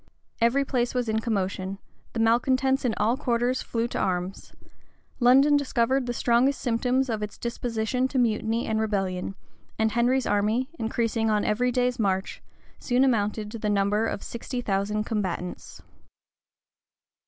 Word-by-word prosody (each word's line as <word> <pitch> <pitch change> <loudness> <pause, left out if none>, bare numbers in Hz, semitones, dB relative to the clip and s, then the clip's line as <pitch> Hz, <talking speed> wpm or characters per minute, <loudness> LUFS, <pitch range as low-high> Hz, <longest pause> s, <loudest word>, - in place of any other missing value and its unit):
Every 255 +4 +3
place 245 -2 -1
was 245 -1 0
in 220 0 +1
commotion: 195 -3 -2 0.4
the 230 - -3
malecontents 260 +4 +2
in 230 - +1
all 230 +3 +2
quarters 250 -2 0
flew 230 0 -2
to - - -3
arms: 180 0 -2 0.7
London 270 +4 +6
discovered 265 -2 +1
the - - -1
strongest 245 +3 +2
symptoms 250 +2 +1
of 220 -3 -2
its 210 0 -5
disposition 235 +1 -1
to 265 - -4
mutiny 225 -1 +1
and 220 0 0
rebellion: 195 -3 -2 0.4
and 220 0 +1
Henry's 245 +3 +2
army, 215 +7 +1
increasing 225 0 0
on 210 -1 +1
every 250 +4 +1
day's 250 0 0
march, 190 -3 -1 0.4
soon 250 +1 +2
amounted 210 -4 0
to 230 - -6
the 210 - -1
number 205 +2 +1
of 200 - -4
sixty 245 +2 -5
thousand 210 -1 -1
combatants. 190 -5 -4
230 Hz, 145 wpm, -26 LUFS, 210-250 Hz, 0.7 s, London